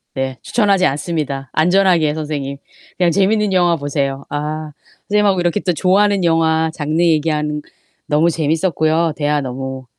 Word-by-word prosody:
네 130 -1 -3
추천하지 200 -5 +2
않습니다. 140 -2 -2
안전하게, 175 -2 +3
선생님 145 -3 -4 0.4
그냥 175 -2 +3
재밌는 200 +3 +2
영화 175 -2 +3
보세요. 140 -1 -3
아. 150 +1 -4 0.4
선생님하고 205 -3 +2
이렇게 175 +3 0
또 180 -3 -1
좋아하는 195 +3 +2
영화 160 -1 +2
장르 155 +1 -1
얘기하는 150 -2 +1 0.4
너무 155 +3 +2
재밌었고요. 160 0 0
대화 150 -1 0
너무 130 0 -6
160 Hz, 355 characters per minute, -17 LUFS, 145-180 Hz, 0.4 s, 안전하게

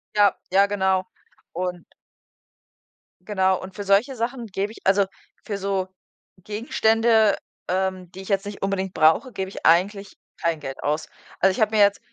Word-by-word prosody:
Ja, 205 -2 +5 0.2
ja, 195 +1 +5
genau. 190 -2 +1 0.5
Und 180 0 -4 1.4
Genau 190 -2 +1
und 185 0 -10
für 205 - -5
solche 200 +7 +2
Sachen 240 +1 -3
gebe 200 +1 -3
ich - - -13
also 195 +1 +4 0.4
für 205 - -4
so 195 -1 -1 0.6
Gegenstände, 220 0 +2 0.3
ähm, 185 -1 -2
die 190 - -9
ich 190 - -10
jetzt 195 0 +1
nicht 205 0 -7
unbedingt 195 -1 -2
brauche, 160 - +3
gebe 190 0 -3
ich - - -9
eigentlich 195 +4 +2 0.2
kein 170 -2 0
Geld 135 -2 -7
aus. 150 +2 -1 0.3
Also 190 - +4
ich 185 - -5
habe 215 0 +2
mir 210 - +5
jetzt 200 0 +4
195 Hz, 165 wpm, -23 LUFS, 185-210 Hz, 1.4 s, Ja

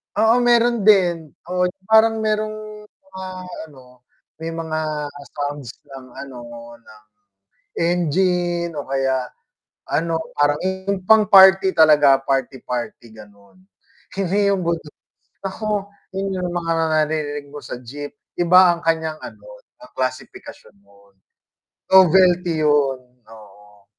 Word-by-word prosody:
Oo 220 +4 +3
meron 240 -3 +2
din, 175 -6 +3 0.2
oo, 180 0 +1 0.2
parang 220 0 +4
merong 215 0 -4
mga 190 -2 -12 0.4
ano, 125 -3 -18 0.4
may 160 - -6
mga 165 -1 -4 0.6
sounds 145 -4 -5 0.2
ng 135 -1 -10
ano, 135 -2 -9 0.4
ng 110 -2 -19 0.8
engine 175 0 0
o 145 - -4
kaya 135 -2 -2 0.6
ano 165 +1 -1 0.2
parang 145 0 +1
yung 190 +1 -3
pang 220 -1 +6
party 190 -1 +6
talaga, 150 -4 +5
party-party, 125 -4 -4
ganon. 100 - -18 0.5
Hindi 200 +1 0
yung 195 - -1
budots, 165 -3 -3 0.5
naku 205 +1 -3 0.2
yun 195 0 -3
yung 175 - -3
mga 170 -1 -3
naririnig 155 -2 -1
mo 145 +1 -11
sa 120 - -7
jeep, 145 - -9 0.2
iba 175 0 +5
ang 170 - -13
kanyang 160 -1 -1
ano, - - -12 0.2
ang 305 - -16
klasipikasyon. 130 -4 -6 1.2
Novelty 180 -2 +5
yun, 145 -3 +2 0.3
oo. 105 -2 -17
165 Hz, 115 wpm, -20 LUFS, 140-190 Hz, 1.2 s, pang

